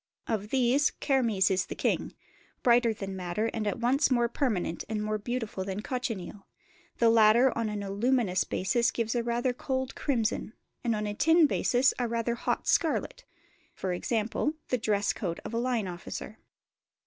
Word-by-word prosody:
Of 210 Hz, -2 st, -2 dB
these, 260 Hz, +3 st, +3 dB
kermes 230 Hz, -9 st, +1 dB
is 185 Hz, -1 st, +1 dB
the -, -, -6 dB
king; -, -, -1 dB, 0.5 s
brighter 240 Hz, -1 st, +4 dB
than 195 Hz, -3 st, -5 dB
madder 185 Hz, +5 st, -2 dB
and 215 Hz, -2 st, -2 dB
at 205 Hz, -, -1 dB
once 260 Hz, +6 st, +2 dB
more 240 Hz, -2 st, +3 dB
permanent 220 Hz, -, -1 dB
and 215 Hz, -1 st, -2 dB
more 215 Hz, 0 st, -1 dB
beautiful 225 Hz, -3 st, -3 dB
than 195 Hz, +2 st, -4 dB
cochineal: 215 Hz, -7 st, -4 dB, 0.5 s
the 230 Hz, -1 st, +4 dB
latter 230 Hz, +3 st, +5 dB
on 230 Hz, -2 st, -1 dB
an 210 Hz, -1 st, -4 dB
aluminous 200 Hz, -1 st, +1 dB
basis 235 Hz, +6 st, +1 dB
gives 230 Hz, -1 st, -2 dB
a 240 Hz, -, +1 dB
rather 240 Hz, +2 st, 0 dB
cold 260 Hz, +1 st, -3 dB
crimson, 230 Hz, -5 st, -1 dB, 0.3 s
and 235 Hz, -2 st, +1 dB
on 210 Hz, 0 st, -2 dB
a 205 Hz, -, -2 dB
tin 325 Hz, +8 st, +5 dB
basis 260 Hz, -2 st, +2 dB
a 245 Hz, -, 0 dB
rather 230 Hz, 0 st, -1 dB
hot 235 Hz, -, -2 dB
scarlet -, -, 0 dB, 0.5 s
(e.g. 195 Hz, +4 st, -1 dB, 0.5 s
the 250 Hz, -, +2 dB
dress 205 Hz, -2 st, +1 dB
coat 170 Hz, -5 st, -3 dB
of -, -, -6 dB
a 230 Hz, -, 0 dB
line 240 Hz, -4 st, 0 dB
officer). 180 Hz, +4 st, -7 dB
230 Hz, 165 wpm, -29 LUFS, 205-245 Hz, 0.5 s, latter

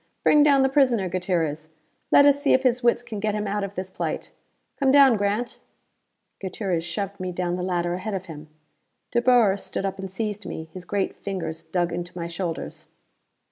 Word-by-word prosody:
Bring 300 Hz, -, +6 dB
down 280 Hz, -2 st, +5 dB
the -, -, +4 dB
prisoner, 255 Hz, -8 st, +2 dB
Gutierrez! 170 Hz, -4 st, -2 dB, 0.4 s
Let 285 Hz, -, +7 dB
us 285 Hz, 0 st, +4 dB
see 285 Hz, -, +3 dB
if 260 Hz, -, +3 dB
his 250 Hz, -1 st, +2 dB
wits 240 Hz, 0 st, +2 dB
can 215 Hz, -3 st, -6 dB
get 210 Hz, 0 st, -1 dB
him 210 Hz, 0 st, -2 dB
out 205 Hz, 0 st, -1 dB
of 200 Hz, 0 st, -5 dB
this 185 Hz, +1 st, -5 dB
plight. -, -, -4 dB, 0.5 s
Come 275 Hz, -2 st, +3 dB
down, 275 Hz, -3 st, +7 dB
Grant!" 205 Hz, +4 st, -1 dB, 0.8 s
Gutierrez 185 Hz, -3 st, -2 dB
shoved 200 Hz, +3 st, -4 dB
me 185 Hz, 0 st, -3 dB
down 175 Hz, 0 st, -2 dB
the 180 Hz, -, -4 dB
ladder 175 Hz, -1 st, -1 dB
ahead 195 Hz, +3 st, -3 dB
of 185 Hz, -1 st, -5 dB
him. 155 Hz, -2 st, -10 dB, 0.6 s
De 240 Hz, -, +2 dB
Boer 240 Hz, -6 st, +5 dB
stood 195 Hz, -, -4 dB
up 195 Hz, 0 st, -3 dB
and 190 Hz, 0 st, -5 dB
seized 210 Hz, +2 st, -4 dB
me. 160 Hz, -, -6 dB
His 185 Hz, -1 st, -8 dB
great 200 Hz, +1 st, -1 dB
fingers 165 Hz, -5 st, -5 dB
dug 175 Hz, +1 st, -1 dB
into 175 Hz, +1 st, -5 dB
my 170 Hz, -, -3 dB
shoulders. 170 Hz, 0 st, -5 dB
195 Hz, 195 wpm, -24 LUFS, 175-230 Hz, 0.8 s, Let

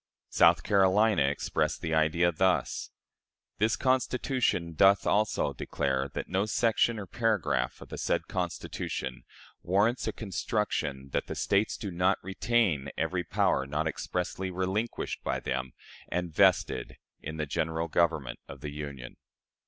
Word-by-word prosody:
South -, -, +5 dB
Carolina 100 Hz, -1 st, +4 dB
expressed 70 Hz, +1 st, 0 dB
the 80 Hz, -, -2 dB
idea 80 Hz, +2 st, +3 dB
thus: 95 Hz, +3 st, 0 dB, 0.7 s
"This 110 Hz, +2 st, +3 dB
Convention 125 Hz, -8 st, 0 dB
doth 100 Hz, +5 st, +5 dB
also 105 Hz, +1 st, +1 dB
declare 65 Hz, 0 st, -1 dB
that -, -, -3 dB
no 95 Hz, +3 st, 0 dB
section 115 Hz, +1 st, +2 dB
or 105 Hz, -, -5 dB
paragraph 100 Hz, -, 0 dB
of -, -, -11 dB
the -, -, -6 dB
said -, -, 0 dB
Constitution 65 Hz, -2 st, -4 dB, 0.4 s
warrants 100 Hz, +8 st, +1 dB
a -, -, +1 dB
construction 90 Hz, -9 st, -2 dB
that -, -, -1 dB
the -, -, -5 dB
States 100 Hz, +2 st, +1 dB
do 100 Hz, -, -5 dB
not 90 Hz, +3 st, +2 dB
retain 95 Hz, -, +1 dB
every 90 Hz, +2 st, -1 dB
power 65 Hz, -5 st, +1 dB
not 75 Hz, +3 st, -1 dB
expressly 90 Hz, +3 st, -3 dB
relinquished 95 Hz, +5 st, -2 dB
by -, -, -1 dB
them 65 Hz, -1 st, -3 dB, 0.3 s
and 90 Hz, -2 st, -3 dB
vested -, -, +2 dB, 0.2 s
in 80 Hz, +2 st, -6 dB
the 75 Hz, -, -1 dB
General 80 Hz, +3 st, -1 dB
Government 80 Hz, -6 st, 0 dB
of 70 Hz, -1 st, -10 dB
the 75 Hz, -, -5 dB
Union." 70 Hz, -4 st, -7 dB
90 Hz, 135 wpm, -29 LUFS, 75-105 Hz, 0.7 s, South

